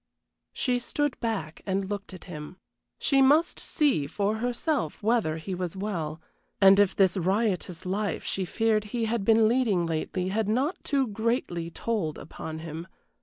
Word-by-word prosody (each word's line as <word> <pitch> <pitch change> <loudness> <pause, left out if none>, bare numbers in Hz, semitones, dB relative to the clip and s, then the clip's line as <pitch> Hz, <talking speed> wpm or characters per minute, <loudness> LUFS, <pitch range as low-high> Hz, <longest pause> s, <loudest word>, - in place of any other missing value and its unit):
She 250 -2 0
stood 290 +3 -2
back 195 -9 -3
and 195 0 0
looked 205 0 -5
at 185 -3 -10
him. 160 0 -8 0.4
She 275 -1 +3
must 295 +6 +4
see 270 - +1
for 205 +7 -1
herself 245 - -1
whether 215 -8 +2
he 175 +4 -5
was 180 0 -3
well, 170 -6 -3 0.4
and 195 0 +7
if 205 -2 +4
this 190 -1 +3
riotous 185 -2 0
life 195 -1 -1
she 190 - -2
feared 215 +2 +1
he 225 +2 -2
had 225 -1 -1
been 225 +1 +5
leading 220 -7 +2
lately 165 +3 -2
had 210 +1 0
not 265 - 0
too 275 -2 +1
greatly 220 -6 -1
told 180 -4 -2
upon 160 0 -7
him. 165 +2 -6
200 Hz, 160 wpm, -27 LUFS, 175-230 Hz, 0.4 s, and